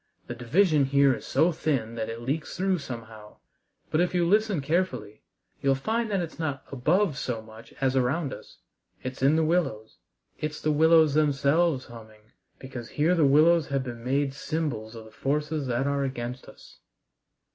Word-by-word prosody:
The - - -5
division 150 - +2
here 140 0 +4
is - - -7
so 160 +6 +3
thin 135 -8 -1
that 115 -1 -4
it 115 +1 -6
leaks 145 +5 -3
through 190 -1 +1
somehow. 115 -5 -9 0.5
But, 155 - +2
if 180 0 0
you 175 -1 +2
listen 210 -1 +2
carefully, 135 - -2 0.4
you'll 135 -1 +3
find 220 - -1
it's 175 -5 -2
not 145 -4 -3
above 155 +5 +1
so 120 -3 -3
much 110 +1 -14
as 135 -1 +1
around 135 +3 0
us. - - -12 0.5
It's 130 +1 -6
in 140 +3 +4
the 160 0 +2
willows. 155 -11 -1 0.4
It's 155 0 -4
the 155 - 0
willows 160 0 +5
themselves 145 0 +2
humming, 110 -2 -14 0.3
because 130 -3 -8
here 155 +4 +2
the 165 -4 +3
willows 155 +3 +5
have 135 -1 -1
been 120 -2 -7
made 135 +2 0
symbols 140 -7 -3
of 110 -1 -9
the 110 - -14
forces 150 +2 -2
that 125 +2 0
are 140 0 0
against 125 -1 -5
us." - - -16
140 Hz, 170 wpm, -27 LUFS, 120-160 Hz, 0.5 s, willows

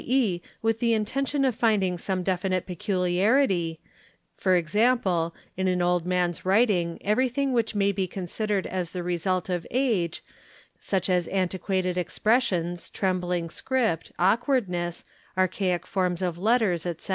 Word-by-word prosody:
e., 235 -9 +1 0.2
with 225 0 +1
the 230 -1 +2
intention 275 +6 0
of 260 - +2
finding 210 -6 +2
some 185 +1 -2
definite 185 0 0
peculiarity, 180 - +1 0.6
¢.g., 185 0 +2 0.2
in 190 +1 0
an 180 -1 +1
old 175 -1 +1
man's 180 -2 0
writing 185 -4 +2
everything 255 +5 +1
which 230 -2 0
may 200 -1 +3
be 190 -1 -1
con 185 0 -5
sidered 205 +1 -1
as 180 -2 -3
the 180 +1 -5
result 180 +1 -1
of 180 -3 -2
age, 220 -10 0 0.6
such 190 -2 -1
as 180 -2 +1
antiquated 185 -1 -1
expressions, 175 -3 0
trembling 180 -3 -1
script, 225 -2 -1
awkwardness, 185 - +1 0.3
archaic 185 -1 +1
forms 185 -3 -1
of 175 -2 -1
letters, 210 -5 +2
etc. 170 +1 -6
185 Hz, 135 wpm, -26 LUFS, 175-220 Hz, 0.6 s, may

